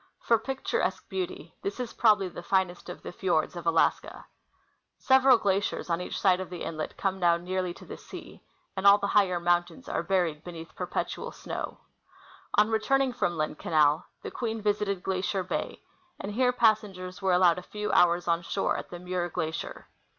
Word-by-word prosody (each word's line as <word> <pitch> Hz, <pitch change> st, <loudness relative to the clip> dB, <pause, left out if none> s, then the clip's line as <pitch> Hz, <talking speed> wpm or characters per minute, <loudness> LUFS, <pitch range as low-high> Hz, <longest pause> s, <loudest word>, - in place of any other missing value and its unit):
For 230 Hz, -1 st, +2 dB
picturesque 270 Hz, -, -2 dB
beauty, 370 Hz, 0 st, -5 dB
this 395 Hz, -8 st, -4 dB
is 250 Hz, -2 st, -4 dB
probably 210 Hz, -4 st, +4 dB
the 175 Hz, -, -8 dB
finest 180 Hz, 0 st, 0 dB
of 175 Hz, -, -8 dB
the -, -, -6 dB
fjords 175 Hz, -3 st, 0 dB
of 170 Hz, -1 st, -6 dB
Alaska. 165 Hz, -1 st, +1 dB, 0.7 s
Several 265 Hz, -1 st, +5 dB
glaciers 195 Hz, -3 st, -1 dB
on 170 Hz, +1 st, 0 dB
each -, -, -4 dB
side 185 Hz, -2 st, +4 dB
of 185 Hz, -, -5 dB
the 180 Hz, -1 st, -6 dB
inlet 155 Hz, -1 st, -5 dB
come 190 Hz, -1 st, -1 dB
down 170 Hz, -1 st, +3 dB
nearly 185 Hz, 0 st, -2 dB
to -, -, -13 dB
the -, -, -8 dB
sea, -, -, -11 dB, 0.3 s
and 190 Hz, +1 st, +2 dB
all 200 Hz, +1 st, +9 dB
the 200 Hz, -, -3 dB
higher 185 Hz, -4 st, +3 dB
mountains 175 Hz, +9 st, 0 dB
are -, -, -1 dB
buried 170 Hz, -4 st, 0 dB
beneath 165 Hz, -2 st, -9 dB
perpetual -, -, -3 dB
snlow^ -, -, -6 dB, 0.8 s
On 210 Hz, +2 st, +4 dB
returning 255 Hz, +4 st, +2 dB
from 175 Hz, -8 st, -1 dB
Lynn 155 Hz, 0 st, -1 dB
canal, 155 Hz, +1 st, +2 dB, 0.2 s
the -, -, -5 dB
Queen 225 Hz, -2 st, -3 dB
visited 205 Hz, -2 st, -1 dB
Glacier 190 Hz, 0 st, -1 dB
bay, 180 Hz, -, -4 dB, 0.4 s
and 200 Hz, -, -5 dB
here 250 Hz, +3 st, +2 dB
passengers 205 Hz, -6 st, +1 dB
were 190 Hz, -1 st, +2 dB
allowed 180 Hz, -1 st, +4 dB
a -, -, -9 dB
few 210 Hz, +3 st, -4 dB
hours 175 Hz, 0 st, +4 dB
on 170 Hz, 0 st, +2 dB
shore -, -, -1 dB
at -, -, -7 dB
the 175 Hz, -, -7 dB
Muir 180 Hz, 0 st, -3 dB
glacier. 160 Hz, -1 st, -4 dB
185 Hz, 180 wpm, -28 LUFS, 175-210 Hz, 0.8 s, all